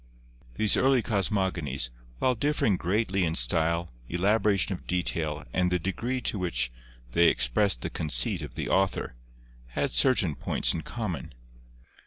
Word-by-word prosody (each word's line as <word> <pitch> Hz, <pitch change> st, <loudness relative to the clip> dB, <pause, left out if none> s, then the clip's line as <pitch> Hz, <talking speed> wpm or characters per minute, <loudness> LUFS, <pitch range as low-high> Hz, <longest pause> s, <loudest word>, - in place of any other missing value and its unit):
These 105 Hz, -, +4 dB
early 130 Hz, -3 st, +3 dB
cosmogonies, 95 Hz, -, -1 dB, 0.3 s
while 130 Hz, -, +2 dB
differing 125 Hz, -5 st, +1 dB
greatly 95 Hz, +1 st, 0 dB
in 80 Hz, -1 st, 0 dB
style, 85 Hz, +7 st, +1 dB, 0.2 s
elaboration 100 Hz, +2 st, +2 dB
of 90 Hz, -, -9 dB
detail 80 Hz, -4 st, -1 dB
and 90 Hz, -1 st, +1 dB
the 90 Hz, -, +3 dB
degree 120 Hz, +8 st, -3 dB
to 105 Hz, -, -2 dB
which 65 Hz, -9 st, 0 dB, 0.4 s
they 85 Hz, +3 st, +4 dB
expressed 100 Hz, -, +3 dB
the -, -, -4 dB
conceit 65 Hz, -6 st, +1 dB
of -, -, -8 dB
the -, -, -3 dB
author, 95 Hz, 0 st, 0 dB, 0.5 s
had -, -, -2 dB
certain 80 Hz, -, +3 dB
points -, -, +1 dB
in 80 Hz, -, -3 dB
common. 100 Hz, -, -5 dB
90 Hz, 140 wpm, -27 LUFS, 80-105 Hz, 0.5 s, These